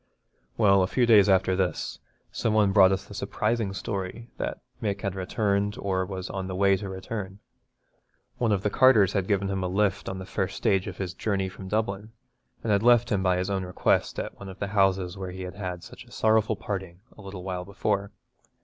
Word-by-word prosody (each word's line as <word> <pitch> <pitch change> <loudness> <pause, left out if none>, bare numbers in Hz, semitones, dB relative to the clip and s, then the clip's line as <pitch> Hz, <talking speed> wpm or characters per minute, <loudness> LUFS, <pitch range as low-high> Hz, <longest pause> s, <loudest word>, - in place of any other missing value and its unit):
Well, 100 -3 +5
a 90 - +2
few 125 +5 +2
days 105 -3 +6
after 95 -1 +3
this, 90 -3 -2 0.3
some 110 -1 0
one 105 -2 +4
brought 95 -2 +6
us 95 - -1
the - - -11
surprising 110 -2 -1
story 100 +4 -5
that - - -3 0.2
Mick 100 -2 -2
had 100 -3 -2
returned 100 +2 -1
or 95 -2 -1
was 95 -1 -5
on 95 -1 -4
the 95 - -4
way 100 +1 +4
to 100 +1 -6
return. 95 +1 -6 1.0
One 115 -3 +2
of 100 -2 +1
the 105 - 0
carters 110 -7 +5
had 95 -2 0
given 100 -1 +1
him 95 -1 -2
a - - 0
lift 100 +1 0
on 95 - -4
the 95 - -7
first 95 0 -3
stage 95 -2 +1
of 95 -2 -6
his 95 -2 -4
journey 95 -3 -1
from 95 0 -10
Dublin, 105 +1 -2 0.5
and 115 - 0
had 100 -1 +3
left 120 0 +4
him 100 -2 +2
by 90 -1 +2
his 90 +2 -1
own 95 -1 -1
request 90 0 0
at - - -5
one 100 - -8
of 95 - -10
the 100 - -3
houses 95 -2 +1
where 95 -1 -4
he 95 +1 -7
had 90 -1 -6
had 90 -2 -5
such - - -11
a - - -20
sorrowful 110 0 +2
parting 95 -3 -5
a - - -13
little 95 -2 -8
while 90 -1 -3
before. 100 +1 -1
95 Hz, 215 wpm, -27 LUFS, 95-105 Hz, 1.0 s, days